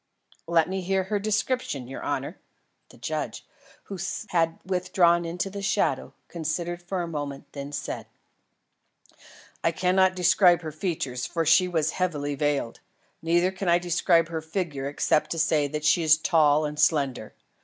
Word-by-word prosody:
"Let 165 -1 +3
me 190 +1 -3
hear 190 +1 0
her 205 +2 -1
description, 215 - -1
your 135 - -7
honour." - - -3 0.5
The - - -17
judge, - - -4 0.4
who 195 -2 -8 0.3
had 165 -2 +1
withdrawn 175 -2 +2
into 175 +3 -3
the 200 +1 -6
shadow, 195 - 0
considered 170 +1 -3
for 180 0 -3
a - - -4
moment, 145 -4 -6
then 140 0 -6
said: 145 - -5 1.6
"I 165 - +3
cannot 185 +2 +2
describe 180 -1 +4
her 155 - -5
features, 140 -7 -3
for 165 +3 -1
she 175 +4 +5
was 160 -4 0
heavily 150 -6 -2
veiled; 140 -4 -1 0.4
neither 175 +3 +2
can 190 -1 -3
I 170 - +5
describe 170 -1 +2
her 160 -1 -3
figure 160 -4 -3
except 150 +1 +1
to - - -6
say 155 -2 +2
that 150 +1 -4
she 160 +3 +4
is 155 -1 +5
tall 155 -2 +3
and 150 0 -5
slender. 140 -7 +1
165 Hz, 155 wpm, -26 LUFS, 150-180 Hz, 1.6 s, she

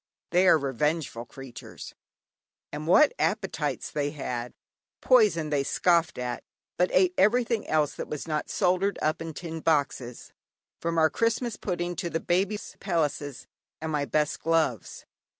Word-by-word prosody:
They 180 +2 +4
are 170 - +7
revengeful 140 -2 -2
creatures. 130 -3 -10 0.8
And 150 +1 -6
what 300 - +6
appetites - - -1
they 145 -1 -1
had? 125 -5 -5 0.4
Poison 425 - +4
they 145 -2 +2
scoffed 170 +3 +2
at, 125 -1 -4 0.3
but 180 +1 +2
ate 185 -1 +4
everything 230 +2 +2
else 150 -2 +1
that - - -6
was 150 +2 -5
not 155 -1 -2
soldered 185 +3 +1
up 155 +2 0
in 165 -2 -6
tin 165 -2 -6
boxes, 140 -6 -1 0.5
(from 170 0 -2
our 160 -1 +4
Christmas 230 0 0
pudding, 175 -2 -3
to 175 -2 -2
the 165 - -1
Baby's 195 +5 -1
pelisses, 150 - -2 0.3
and 160 0 -4
my 145 -2 0
best 150 +4 0
gloves). 160 -8 0
160 Hz, 145 wpm, -27 LUFS, 145-180 Hz, 0.8 s, are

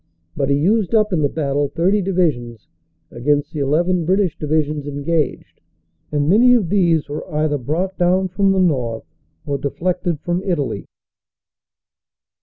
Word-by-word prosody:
But 135 - -1
he 140 - +3
used 205 +7 +1
up 215 -2 +2
in 165 - +1
the 145 - +2
battle 145 -2 -1
30 185 +8 +1
divisions 150 - -1 0.4
against 145 +5 -1
the 155 - -4
11 170 +6 +1
British 185 -1 +1
divisions 150 -1 -1
engaged, 145 +2 -2 0.5
and 145 -1 0
many 240 +8 +5
of 205 -9 0
these 170 -6 +2
were 150 +1 -6
either 150 -1 0
brought 170 +9 -3
down 185 +2 +2
from 195 +2 +2
the 195 - +1
north 125 -11 0 0.4
or 140 -1 -2
deflected 170 +3 -2
from 175 +1 -1
Italy. 150 - -2
160 Hz, 145 wpm, -19 LUFS, 145-185 Hz, 0.5 s, many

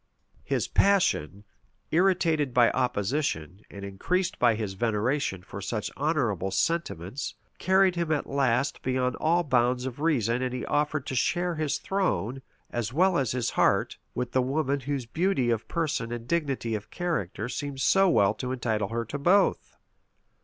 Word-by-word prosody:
His - - -1
passion, 105 - +2 0.5
irritated 165 -6 +2
by 120 -2 +5
opposition, 115 - -1
and 100 0 -8
increased 175 - -1
by 120 -2 +4
his 105 -3 -3
veneration 110 -1 -1
for 100 +1 -8
such 105 +1 -3
honorable 130 - 0
sentiments 100 - -2 0.2
carried 190 -1 +3
him 170 -2 -1
at 150 - 0
last 135 0 0
beyond 125 -1 0
all 170 +2 +2
bounds 125 -3 +1
of 130 0 -5
reason 125 -7 +1
and 125 -1 -2
he 125 - -4
offered 150 -1 0
to - - -4
share 175 +7 +1
his 155 -3 -1
throne, 135 - -1 0.3
as 120 -1 -2
well 185 +6 +3
as 130 -7 +1
his 125 -2 -1
heart, - - +1 0.2
with 125 -1 -2
the 130 - +2
woman 140 +2 0
whose 135 -1 -3
beauty 160 -2 +1
of 115 -1 -2
person 155 -8 -2
and 120 -1 -5
dignity 140 -8 -1
of 105 -1 -4
character 165 - -3
seemed 140 +1 -5
so 195 +7 +4
well 100 - +4
to 125 +3 -5
entitle 110 -5 -1
her 115 0 -2
to 140 +6 -5
both. 180 +8 +2
130 Hz, 160 wpm, -27 LUFS, 115-155 Hz, 0.5 s, by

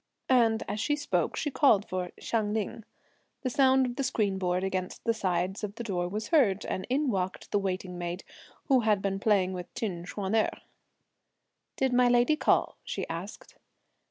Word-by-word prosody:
And 230 -4 +4
as 210 - -3
she 290 +7 +1
spoke, 295 - -1
she 295 - -2
called 225 -9 +4
for 180 -1 -3
Hsiang 215 -2 -1
Ling. 220 0 -3 0.6
The 255 - -1
sound 265 0 +4
of 245 -1 -4
the 275 - 0
screen 210 -7 0
board 180 0 0
against 185 -1 -3
the 230 - +2
sides 185 -1 -1
of 205 0 -4
the 235 - -5
door 180 -5 -1
was 215 +3 -4
heard, 230 - +3
and 185 - -3
in 275 +1 +1
walked 190 -2 -3
the 205 - +2
waiting 185 -2 -3
maid, 175 +1 -4 0.4
who 270 -3 +4
had 215 -4 +2
been 195 -1 -1
playing 195 -3 +2
with 180 -1 -7
Chin 180 -6 -3
Ch'uan 195 +1 -4
erh. 220 - +1 1.2
"Did 265 -1 +1
my 250 0 +5
lady 245 +4 +4
call?" - - +2
she - - -4
asked. - - -7
210 Hz, 185 wpm, -29 LUFS, 185-245 Hz, 1.2 s, my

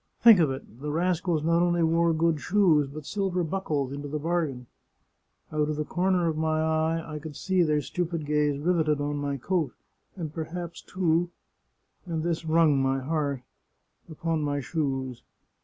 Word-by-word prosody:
Think 225 -5 +8
of 160 -4 +4
it! 130 -2 -7
The 150 - -3
rascals 170 -1 0
not 165 +1 +3
only 175 -1 +2
wore 165 +1 +3
good 165 -1 +1
shoes, 170 -9 +3
but 150 0 -8
silver 190 -2 -1
buckles 155 -6 -2
into 145 +1 -5
the 150 +2 -3
bargain! 155 -5 -1 0.9
Out 150 -1 0
of 155 - -1
the 150 0 -2
corner 180 0 +1
of 160 - 0
my 155 0 0
eye 160 +1 +1
I 155 -1 -6
could 155 -1 -8
see 185 +4 +1
their 150 -3 +2
stupid 170 +1 -3
gaze 150 -1 +1
riveted 155 -1 +1
on 145 0 -2
my 140 -1 -2
coat, 160 0 -1 0.4
and 160 -5 -5
perhaps, 170 +1 -5
too 175 -2 0 0.4
— - - -45
and 160 -2 -2
this 170 -1 -1
wrung 160 -3 +4
my 135 0 +1
heart 140 -2 -2 0.3
— - - -35
upon 160 0 -1
my 145 -1 -1
shoes. 135 -4 -2
160 Hz, 175 wpm, -27 LUFS, 145-170 Hz, 0.9 s, Think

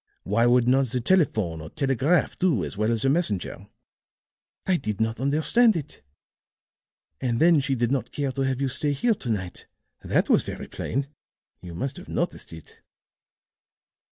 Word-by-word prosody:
Why 115 +5 +2
would 120 0 +4
not 135 +1 +3
the 125 +2 -1
telephone 110 - +1
or 80 - -8
telegraph 135 - +1
do 160 - +1
as - - -6
well 105 +2 0
as 115 +2 0
a - - +4
messenger? 135 - -1 1.0
I 185 -2 +2
did 105 -8 -4
not 110 +1 -1
understand 155 - +3
it. 150 -3 -6 1.2
And 120 -2 0
then 165 0 +5
she 135 -1 0
did 120 0 0
not 130 -5 -1
care 140 -2 -2
to 135 - -4
have 135 -1 0
you 140 - 0
stay 145 +3 0
here 230 - +2
to 130 - -7
night; 95 -5 -4 0.4
that - - +1
was - - +4
very - - -7
plain 135 +3 -3 0.6
you 85 -2 -9
must 135 - -4
have - - -11
noticed - - -3
it." 80 -2 -13
130 Hz, 170 wpm, -25 LUFS, 110-145 Hz, 1.2 s, then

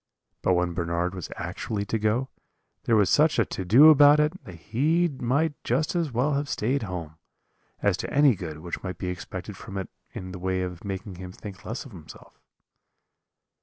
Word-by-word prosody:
"But 90 - +3
when 90 -1 0
Bernard 85 +1 -1
was 90 -3 -6
actually 100 -2 -4
to 110 +2 -1
go, 110 +5 0 0.6
there 115 - +3
was 105 -3 +4
such 155 +1 +4
a 115 - +3
to 95 - -5
do 130 - +8
about 145 0 +7
it, 150 +5 0
that 90 - -9
he 150 - +1
might 140 +2 0
just 145 +9 0
as 165 -5 0
well 125 +5 +1
have 140 +1 -1
stayed 130 +6 0
at 100 - -5
home, 80 -4 -6 0.7
as 100 -3 +3
to - - -5
any 145 -2 +5
good 80 -6 -7
which 85 0 -5
might 90 -3 -5
be 90 - -3
expected 90 +2 -6
from 100 - -8
it 95 - -5 0.2
in 95 0 -7
the 90 - -7
way 95 0 -1
of 90 -2 -6
making 95 -1 -5
him 90 0 -8
think 95 -1 -10
less 115 +6 -5
of 135 - -12
himself. 85 -6 -14
100 Hz, 200 wpm, -26 LUFS, 90-140 Hz, 0.7 s, do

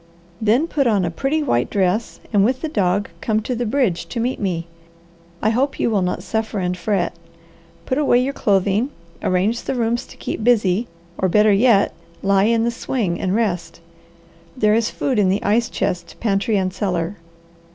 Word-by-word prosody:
Then 225 +8 +3
put 285 -5 0
on 205 -5 +2
a 170 - -2
pretty 275 - -1
white 125 - +1
dress, 200 +3 0
and 200 -1 +5
with 255 +4 +1
the 320 - -2
dog, 200 -6 0
come 215 -1 +1
to 250 - -3
the 240 -1 -2
bridge 230 -8 0
to 240 - -4
meet 245 +3 -1
me. 175 -5 -2 0.8
I 220 - +3
hope 265 +5 0
you - - +1
will 205 -3 +2
not 180 0 -2
suffer 220 -1 -2
and 180 -1 -1
fret. 180 0 -1 0.7
Put 260 - 0
away 285 -5 +4
your 260 +3 0
clothing, 200 +2 +1 0.3
arrange 195 +6 +1
the - - -3
rooms 235 0 -1
to - - -14
keep - - -4
busy, 220 -2 +2 0.3
or 185 - +2
better 210 +2 +5
yet, 205 -1 +4 0.3
lie 195 0 +3
in 230 0 +2
the 235 - +1
swing 230 -6 -2
and 185 +1 0
rest. 175 -7 -1 0.8
There 210 -3 +3
is 225 +1 +2
food 260 -6 -1
in 195 -2 +3
the 195 +2 0
ice 225 +3 +2
chest, 175 -1 -3
pantry, 205 0 +1
and 185 -1 -1
cellar. 180 -1 -2
210 Hz, 185 wpm, -20 LUFS, 190-235 Hz, 0.8 s, and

